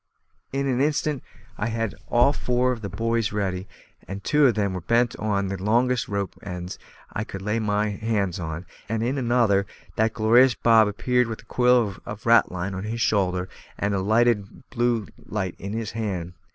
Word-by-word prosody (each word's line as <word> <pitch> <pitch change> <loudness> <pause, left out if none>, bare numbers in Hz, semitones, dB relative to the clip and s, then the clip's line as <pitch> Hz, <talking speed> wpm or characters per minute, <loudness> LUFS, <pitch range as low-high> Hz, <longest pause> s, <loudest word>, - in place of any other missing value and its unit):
In 140 +1 -1
an 130 -1 +1
instant 150 -1 0 0.4
I 105 - 0
had 115 -2 -2
all 120 +4 +4
four 125 -1 +1
of 120 -3 -4
the 100 - -4
buoys 115 +3 0
ready, 95 -2 -2 0.4
and 95 +1 -6
two 150 +3 +4
of 120 - +2
them 100 -3 0
bent 120 +1 +3
on 100 -2 0
to 100 - -3
the 95 - -9
longest 120 +3 +2
rope 100 -2 -3
ends 90 -1 -6 0.3
I 105 - -2
could 95 -3 -8
lay 105 +3 0
my 105 0 +1
hands 100 -4 -1
on, 80 +1 -5 0.2
and, 115 0 -1
in 130 +4 0
another, 115 -5 +2 0.3
that 110 0 +2
glorious 120 +2 +5
Bob 115 -2 +5
appeared 125 +4 +1
with 115 -2 -6
a - - -27
coil 125 -5 +3
of 105 0 -8
ratline 100 -5 +3
on 95 +2 -4
his 115 +2 -3
shoulder 95 -4 +1 0.3
and 100 +1 0
a 100 - +1
lighted 110 +1 +1
blue 120 -3 +1 0.2
light 95 -4 -3
in 100 +2 -5
his 110 -1 -3
hand. 95 -6 -3
110 Hz, 185 wpm, -24 LUFS, 100-120 Hz, 0.4 s, glorious